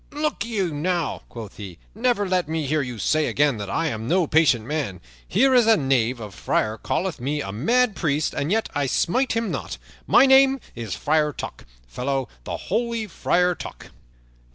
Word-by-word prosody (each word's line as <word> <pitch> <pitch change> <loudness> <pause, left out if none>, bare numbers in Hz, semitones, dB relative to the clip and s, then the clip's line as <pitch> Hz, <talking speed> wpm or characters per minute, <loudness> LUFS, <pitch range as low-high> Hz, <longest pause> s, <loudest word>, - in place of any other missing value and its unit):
"Look 300 -7 -1
you 195 -8 -1
now," 170 +1 -1
quoth 110 -4 -9
he, 95 -5 -8 0.2
"never 225 -2 +1
let 180 -4 0
me 160 -1 -1
hear 150 +2 +1
you 125 -3 -5
say 155 +8 +1
again 145 -4 +2
that 100 -2 -5
I 165 - 0
am 115 -7 -3
no 180 +4 +3
patient 150 -8 +3
man. 130 - -3 0.3
Here 260 +8 +3
is 245 -3 +5
a 225 - +6
knave 130 -4 +1
of 105 -3 -8
a - - -15
friar 110 +3 -1
calleth 180 -7 -2
me 145 +4 -1
a 95 - -4
mad 225 - +2
priest, 155 -2 0
and 145 +5 -2
yet 220 +1 +1
I 145 -2 0
smite 250 - +1
him 230 -2 -1
not. - - -4 0.3
My - - +6
name 270 0 +6
is 115 -5 -5
Friar 150 0 +1
Tuck, - - -8 0.2
fellow 130 - -2 0.2
the - - -4
holy 235 -1 -2
Friar 180 -2 +1
Tuck." - - -10
155 Hz, 190 wpm, -23 LUFS, 125-210 Hz, 0.3 s, a